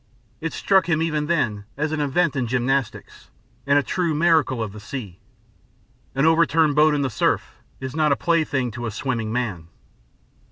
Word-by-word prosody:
It 165 0 -3
struck 190 -3 +2
him 160 -1 +2
even 150 -2 -1
then 110 -12 0
as 150 +1 -1
an 155 -1 -1
event 145 +2 +1
in 130 -3 -1
gymnastics, 125 +1 -2 0.4
and 140 0 +4
a 145 - +3
true 170 +1 -1
miracle 155 -7 +2
of 105 -3 -6
the 105 - -9
sea. 105 -4 -7 1.0
An 135 +2 +2
over 160 +1 +5
turned 155 -2 +2
boat 150 0 +4
in 145 - 0
the 135 - 0
surf 105 - -1 0.2
is 130 +1 -6
not 155 -2 +2
a - - +4
plaything 145 -7 0
to 120 +2 -5
a - - -2
swimming 115 -1 -3
man. 110 -9 -3
140 Hz, 185 wpm, -22 LUFS, 120-160 Hz, 1.0 s, over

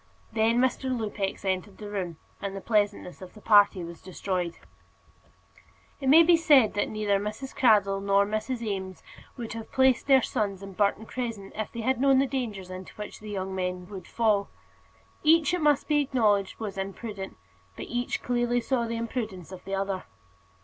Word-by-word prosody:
Then 225 +1 +2
Mr. 260 +1 +1
Lupex 210 -5 -3
entered 190 +1 -2
the 210 - -8
room, 185 -5 -4 0.2
and 200 -1 -4
the - - -4
pleasantness 205 -4 -1
of 185 +2 -11
the - - -12
party 205 -4 +5
was 170 0 -9
destroyed. 180 -2 -3 1.4
It 270 - 0
may 320 +4 +9
be 340 +1 +6
said 290 -9 +5
that 205 - 0
neither 210 -2 0
Mrs. 215 +6 -5
Cradell 200 -5 +4
nor 200 0 +3
Mrs. 215 +4 -3
Eames 190 -4 -4 0.3
would 235 -2 -5
have 225 -1 -8
placed 260 -1 +3
their 265 -3 +6
sons 200 -2 -2
in 195 -1 -8
Burton 205 +2 +1
Crescent 225 -6 -5
if 215 0 -4
they 235 - -5
had 260 +2 0
known 270 -1 +5
the 270 - +4
dangers 220 -9 -4
into 185 0 -9
which 210 -1 -8
the 215 - -9
young 190 -2 -3
men 180 -1 -3
would 190 -4 -8
fall. 215 -4 +1 0.7
Each, 320 0 +4
it 360 - 0
must 295 -2 +3
be 295 -1 +3
acknowledged, 215 -8 +1
was 205 -3 -5
imprudent; 195 0 -6 0.4
but - - -6
each 245 +1 -3
clearly 240 0 +1
saw 240 -1 -1
the 230 0 -3
imprudence 220 -7 -4
of 185 -1 -9
the 195 0 -2
other. 195 -1 -2
210 Hz, 180 wpm, -27 LUFS, 195-245 Hz, 1.4 s, may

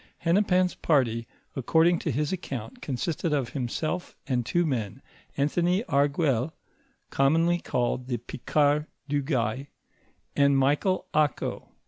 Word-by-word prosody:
f - - -27 0.2
Hennepin's 180 0 +3
party, 115 -7 +1 0.3
according 160 +6 +3
to - - -3
his 150 +4 -1
account, 130 -11 -6
consisted 155 +4 -2
of 135 -5 0
himself 155 +7 -3
and 125 -3 0
two 175 +8 +1
men, 125 -4 -3 0.3
Anthony 175 +7 +1
Auguelle, 140 - +1 0.6
commonly 165 +5 +3
called 125 -4 -1
the 125 -2 -1
Picard 145 +5 0 0.2
du 145 0 0
Gay, 130 -1 -1 0.7
and 140 -1 +4
Michael 145 +8 +2
Ako. 150 -3 0
145 Hz, 120 wpm, -27 LUFS, 130-165 Hz, 0.7 s, and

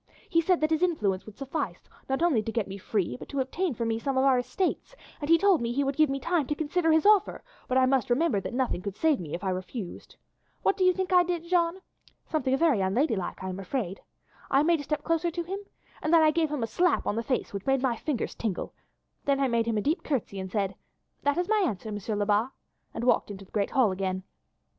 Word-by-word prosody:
He 335 - +3
said 355 0 +2
that 310 +1 +1
his 320 0 +2
influence 210 - 0
would 215 - -11
suffice, 275 +3 -4 0.2
not 270 +5 0
only 300 -11 +3
to 225 - -4
get 225 -3 -1
me 195 +1 -7
free, 185 - -1
but - - -11
to 280 - -3
obtain 290 +4 -1
for 235 - -2
me 225 0 0
some 270 +2 -2
of 260 - +4
our 260 -2 +5
estates, 370 - -2 0.2
and 290 - -5
he 330 - +7
told 380 -3 +4
me 235 0 -1
he 280 +4 +1
would 275 0 -1
give 310 -1 +4
me 275 0 -1
time 325 -1 0
to 295 - -1
consider 320 +2 +1
his 320 +2 +3
offer, 420 -1 +4 0.2
but 255 - -1
that 260 - +5
I - - +5
must 255 -3 +1
remember 245 -5 +2
that 240 - -5
nothing 250 -8 0
could 200 0 -5
save 315 0 +2
me 155 -4 -5
if 175 - -7
I 190 - 0
refused. 185 +1 -6 0.5
What - - +3
do 380 - 0
you 365 - +6
think 375 0 -2
I 360 - +7
did, 350 -1 -2
Jeanne? 340 +1 +1 0.4
Something 270 -5 0
very 290 -9 +3
unladylike, 195 - 0
I 190 - -3
am 185 +1 -5
afraid. 195 -1 -3 0.5
I 275 +2 +4
made 335 0 +3
a - - -5
step 300 0 -2
closer 330 +1 +1
to 345 +1 -3
him, 385 +4 -4 0.4
and 310 - -1
then 330 -1 +6
I 310 - +5
gave 320 -1 +1
him 290 -5 -2
a - - -1
slap 355 +8 +1
on - - 0
the 230 - 0
face 255 -2 -2
which 200 +3 -6
made 270 -1 +2
my 250 -3 +2
fingers 265 +1 -3
tingle, 210 -6 -3 0.5
then 280 -1 +2
I 275 - +3
made 235 -2 +1
him 225 -2 0
a - - +1
deep 305 - 0
curtsy 240 -9 -2
and 190 -1 -6
said, 200 -3 0 0.5
'That 285 +2 +1
is 355 0 0
my 430 -2 +3
answer, 220 - -2
Monsieur 210 +1 -3
Lebat,' 205 +3 +2 0.5
and - - -3
walked 245 - +2
into 195 -1 -8
the - - -27
great 205 -2 0
hall 250 -7 +3
again. 185 0 -2
270 Hz, 255 wpm, -28 LUFS, 210-325 Hz, 0.5 s, he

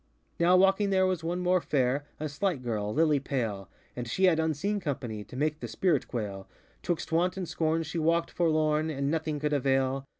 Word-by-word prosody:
Now 175 +2 +5
walking 195 +2 +4
there 190 -1 +3
was 185 -3 -1
one 175 +2 -2
more 180 0 +2
fairŌĆö 135 -2 +1 0.2
A 155 - -1
slight 150 -1 -2
girl, 105 -3 -2
lily 150 +1 +3
pale; 115 -8 -3 0.3
And 125 -1 -5
she 185 +11 -2
had 175 -4 +5
unseen 160 +6 0
company 120 - -4
To 125 - -13
make 150 +3 -1
the - - -5
spirit 170 -8 0
quailŌĆö 100 -5 -5 0.3
ŌĆÖTwixt 175 -2 -3
Want 175 +3 +1
and 185 -2 -3
Scorn 160 0 0
she 165 +2 -4
walkŌĆÖd 165 +1 +1
forlorn, 155 -2 +1
And 140 -1 -1
nothing 155 -2 -1
could 150 0 -1
avail. 135 0 +1
155 Hz, 195 wpm, -29 LUFS, 135-175 Hz, 0.3 s, Now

